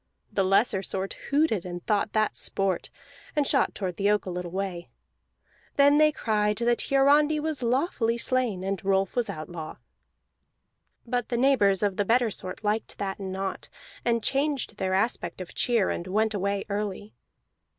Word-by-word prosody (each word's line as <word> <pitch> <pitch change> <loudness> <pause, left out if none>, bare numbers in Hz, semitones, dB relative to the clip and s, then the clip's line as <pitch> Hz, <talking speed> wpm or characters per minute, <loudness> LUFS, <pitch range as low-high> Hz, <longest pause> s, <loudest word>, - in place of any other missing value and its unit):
The 195 - +2
looser 195 +1 +3
sort 195 0 -3 0.2
hooted 280 - +2
and 175 -1 -7
thought 210 0 0
that 215 -1 +1
sport, 195 -2 -1 0.5
and 295 -1 +2
shot - - +1
toward 185 -4 -4
the 200 0 +2
oak 210 0 +2
a 185 - -4
little 180 0 -4
way. 185 -1 -4 0.9
Then 285 +1 +5
they 305 0 +6
cried 210 -5 0
that 235 0 +1
Hiarandi 290 +3 +4
was 310 -2 -3
lawfully 240 -2 +1
slain, 235 -6 +1
and 195 -1 -3
Rolf 195 0 +1
was 245 -2 0
outlaw. 155 0 -6 1.3
But 245 -1 -2
the 240 - 0
neighbors 220 -7 +3
of 200 -2 0
the 205 - +2
better 235 +1 +3
sort 185 +2 -6
liked 215 +1 -1
that 195 -1 -3
not, 190 0 -4 0.3
and 235 -2 +1
changed 275 -5 0
their 190 -1 0
aspect 190 -4 -1
of 185 - -8
cheer, 230 -6 +2
and 170 - -4
went 215 +3 +1
away 200 0 -1
early. 205 0 -4
210 Hz, 160 wpm, -27 LUFS, 190-245 Hz, 1.3 s, they